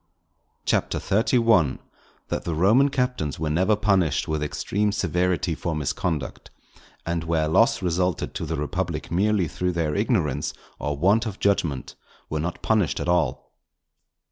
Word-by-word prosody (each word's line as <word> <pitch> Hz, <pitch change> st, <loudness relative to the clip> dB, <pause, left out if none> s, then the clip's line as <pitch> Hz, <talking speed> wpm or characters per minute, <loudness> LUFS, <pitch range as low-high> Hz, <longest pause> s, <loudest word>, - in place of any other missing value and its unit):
CHAPTER -, -, +1 dB
XXXI.—_That 110 Hz, -, 0 dB
the 85 Hz, -, -2 dB
Roman 110 Hz, -, +4 dB
Captains 125 Hz, -, -1 dB
were 80 Hz, -1 st, -1 dB
never 95 Hz, +7 st, +3 dB
punished 95 Hz, -8 st, +1 dB
with 80 Hz, -1 st, -1 dB
extreme 100 Hz, +7 st, -1 dB
severity 90 Hz, -3 st, 0 dB
for 80 Hz, +1 st, -3 dB
Misconduct; 75 Hz, +1 st, -3 dB, 0.6 s
and 85 Hz, -1 st, -1 dB
where 80 Hz, -2 st, 0 dB
loss 95 Hz, +5 st, +3 dB
resulted 90 Hz, -1 st, 0 dB
to -, -, -4 dB
the -, -, -2 dB
Republic 80 Hz, +2 st, -3 dB
merely 100 Hz, 0 st, +2 dB
through 90 Hz, +4 st, -2 dB
their 80 Hz, -3 st, -1 dB
Ignorance -, -, 0 dB, 0.2 s
or 75 Hz, -1 st, -2 dB
Want 100 Hz, +9 st, +3 dB
of 105 Hz, -2 st, -5 dB
Judgment, 85 Hz, -9 st, 0 dB, 0.4 s
were 75 Hz, -, -1 dB
not 85 Hz, +3 st, -4 dB
punished 100 Hz, -11 st, +1 dB
at -, -, -2 dB
all_. 85 Hz, -3 st, +2 dB
90 Hz, 140 wpm, -24 LUFS, 80-100 Hz, 0.6 s, Roman